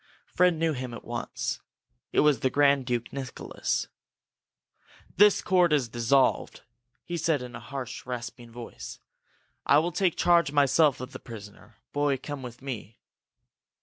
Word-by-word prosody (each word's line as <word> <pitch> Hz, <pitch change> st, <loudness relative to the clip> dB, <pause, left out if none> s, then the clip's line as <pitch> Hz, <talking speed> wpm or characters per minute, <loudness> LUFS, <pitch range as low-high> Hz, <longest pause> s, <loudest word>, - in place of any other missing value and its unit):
Fred 180 Hz, -1 st, +3 dB
knew 160 Hz, 0 st, +1 dB
him 125 Hz, -3 st, -5 dB
at -, -, -11 dB
once. 120 Hz, 0 st, -4 dB, 0.5 s
It -, -, +4 dB
was 150 Hz, -2 st, +4 dB
the 130 Hz, -, +1 dB
Grand 140 Hz, -2 st, +3 dB
Duke 120 Hz, -2 st, -2 dB
Nicholas. 135 Hz, -2 st, -3 dB, 1.3 s
"The 205 Hz, +1 st, +6 dB
court 180 Hz, -3 st, +4 dB
is 140 Hz, -6 st, +2 dB
dissolved!" 120 Hz, +3 st, +2 dB, 0.4 s
he 175 Hz, -, -4 dB
said, 160 Hz, -5 st, +1 dB
in 125 Hz, -1 st, -8 dB
a -, -, -6 dB
harsh, 125 Hz, 0 st, -7 dB
rasping 120 Hz, -1 st, -6 dB
voice. 120 Hz, 0 st, -9 dB, 0.7 s
"I 145 Hz, -, +5 dB
will 165 Hz, +3 st, +2 dB
take 180 Hz, 0 st, +1 dB
charge 170 Hz, -4 st, +4 dB
myself 145 Hz, -1 st, +4 dB
of 125 Hz, +1 st, -7 dB
the -, -, -8 dB
prisoner. 105 Hz, -1 st, -12 dB, 0.2 s
Boy, 145 Hz, -1 st, +1 dB
come 145 Hz, +1 st, -6 dB
with 125 Hz, 0 st, -9 dB
me!" 115 Hz, -5 st, -6 dB
135 Hz, 150 wpm, -27 LUFS, 120-150 Hz, 1.3 s, The